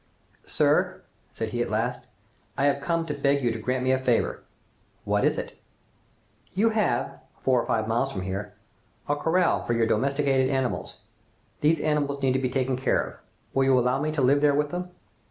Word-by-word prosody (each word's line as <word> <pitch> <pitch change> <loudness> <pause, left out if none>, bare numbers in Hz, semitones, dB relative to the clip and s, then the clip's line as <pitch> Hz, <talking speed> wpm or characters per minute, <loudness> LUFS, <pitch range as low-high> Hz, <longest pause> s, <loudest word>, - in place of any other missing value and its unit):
"Sir," - - +1 0.3
said 110 - -4
he 120 +2 -2
at - - -1
last, 120 +4 -2 0.5
"I 140 - +2
have 140 0 +2
come 165 +2 0
to 150 - -3
beg 140 -1 +1
you 120 - +2
to 115 - -4
grant 125 +3 -1
me 130 - +2
a 130 - +2
favor." 125 -3 0 0.6
"What - - +1
is - - +2
it?" - - -6 0.9
"You 220 +4 +3
have, 215 -1 0 0.2
four 130 -2 +3
or - - -7
five 110 -1 0
miles 120 +4 0
from 95 -6 -4
here, 100 +2 -5 0.5
a 145 - +1
corral 165 +4 +1
for 120 - -1
your 115 -1 +2
domesticated 135 +3 +1
animals. 130 -2 -2 0.6
These 155 +1 +2
animals 145 -2 0
need 130 -1 +3
to 130 - +1
be 130 -1 -1
taken 130 0 0
care 130 - +1
of. - - -3 0.4
Will 135 0 +2
you 135 -1 +4
allow 125 +2 +1
me 155 +1 0
to 145 -4 0
live 140 +3 +4
there 145 -1 +4
with 150 0 0
them?" 180 0 -4
135 Hz, 195 wpm, -26 LUFS, 125-145 Hz, 0.9 s, you